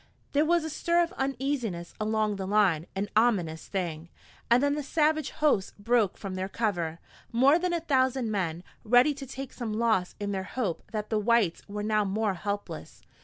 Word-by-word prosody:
There 290 +2 +3
was 340 0 +3
a 320 - -3
stir 340 +3 +2
of 340 - -4
uneasiness 265 -10 -2
along 215 -1 0
the 190 -1 -4
line, 190 -6 +2
an 195 +2 -1
ominous 190 -9 +2
thing. 170 -4 -3 0.4
And 240 +3 +5
then 285 0 +3
the 295 - -2
savage 310 +1 +1
hosts 290 -11 +1
broke 220 -1 +1
from 195 -2 -6
their 185 +1 -3
cover, 175 -8 -1 0.3
more 270 +7 +5
than 360 0 0
a 340 -1 0
thousand 260 -6 +1
men, 175 -4 -2 0.2
ready 245 +6 +5
to 275 -1 -8
take 270 0 -7
some 230 -4 -4
loss 220 -5 +1
in 205 -1 -2
their 190 -1 -1
hope 195 -2 -4
that 215 0 -4
the 215 - +2
whites 210 -5 +2
were 205 0 -4
now 215 0 +2
more 205 +1 0
helpless. 200 +3 -5
215 Hz, 185 wpm, -28 LUFS, 195-270 Hz, 0.4 s, And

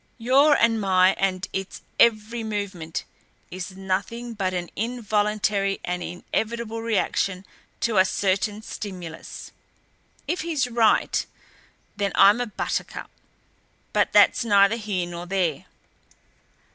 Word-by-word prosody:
"Your 270 +5 +4
and 225 -1 +3
my 185 -1 +4
and 190 -1 0
its 190 0 -5 0.2
every 230 0 +3
movement 200 -7 -4 0.5
is 185 +1 -7
nothing 200 +5 -3
but 195 -4 -1
an 180 -1 -4
involuntary 210 -3 0
and 180 0 -2
inevitable 225 +6 -3
reaction 195 -4 -1 0.4
to 230 -3 +1
a 185 - +6
certain 200 +3 0
stimulus. 180 -8 -8 0.8
If 355 - -1
he's 310 -6 0
right, 230 -2 +2 0.7
then 200 -1 -1
I'm 205 +5 +6
a 245 - -2
buttercup 215 - -4 0.8
but - - +2
that's - - +5
neither 200 -1 +4
here 205 -5 -2
nor 175 0 -7
there. 175 -6 -1
205 Hz, 115 wpm, -24 LUFS, 185-230 Hz, 0.8 s, a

